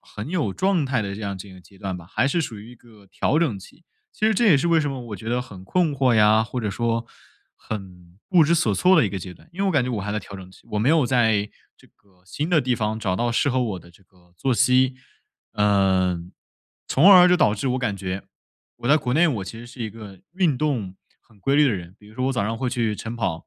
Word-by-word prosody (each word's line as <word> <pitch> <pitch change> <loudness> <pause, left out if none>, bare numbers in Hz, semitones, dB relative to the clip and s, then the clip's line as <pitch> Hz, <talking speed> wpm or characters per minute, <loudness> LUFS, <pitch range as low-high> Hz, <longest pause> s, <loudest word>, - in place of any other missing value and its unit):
很 105 +6 -8
有 155 - -1
状 185 - +1
态 130 -3 0
的 100 -2 -4
这 110 - -8
样 100 -2 -4
这 100 +1 -10
个 95 - -13
阶 95 +2 -20
段 95 -3 -4
吧， 85 -2 -12
还 135 +8 0
是 170 - 0
属 110 -7 -6
于 110 +4 -12
一 - - -13
个 110 -4 -20
调 140 +9 0
整 145 -12 0
期。 130 - -16 0.3
其 215 - 0
实 220 - +3
这 240 - +2
也 165 -9 +6
是 170 - 0
为 165 -1 +4
什 150 -2 -1
么 135 -2 -5
我 105 - -6
觉 105 - -12
得 125 +1 0
很 100 -7 -10
困 175 - +1
惑 130 -2 +2
呀， 110 0 +4
或 125 +2 -5
者 110 - -2
说 115 +2 -1 0.5
很 90 -4 -9
不 180 -4 +5
知 155 - +1
所 170 - +1
措 185 +1 +4
的 115 - +2
一 - - -2
个 100 - -5
阶 90 0 -8
段。 90 - -20
因 180 - -8
为 200 - +1
我 190 - +2
感 145 -5 +3
觉 125 - -3
我 110 -5 -3
还 105 - -4
在 105 - -1
调 100 - -12
整 95 -1 -11
期， - - -19
我 105 - 0
没 115 - +1
有 155 -5 +3
在 110 -5 +2 0.3
这 - - -21
个 95 -3 -30
新 150 - -4
的 165 -3 +4
地 125 -2 0
方 110 -1 -2
找 95 -4 -1
到 120 +3 0
适 130 - +1
合 130 -1 +1
我 105 -6 -3
的 85 0 -16
这 90 - -22
个 90 -2 -28
作 130 +7 0
息， 130 +1 +3 0.6
呃， 95 -3 +2 0.7
从 170 +9 +6
而 180 -2 +9
就 180 - +4
导 105 -11 +3
致 120 +5 -2
我 125 - 0
感 115 -6 -2
觉， 95 0 -5 0.5
我 120 - -4
在 150 - +6
国 125 -3 -2
内 170 +4 +4
我 110 -10 -2
其 115 - -8
实 120 - -10
是 120 +1 -13
一 110 - -3
个 105 -3 -12
运 175 -8 +1
动 125 -11 -2 0.3
很 110 -3 -25
规 135 - 0
律 150 - +6
的 140 - +3
人。 90 -4 -5
比 105 - -18
如 110 - -17
说 130 0 -1
我 135 - +1
早 125 - -1
上 115 +2 -3
会 130 0 -1
去 115 -3 -1
晨 115 +1 -6
跑， 95 -8 -3
115 Hz, 295 characters per minute, -23 LUFS, 100-135 Hz, 0.7 s, 而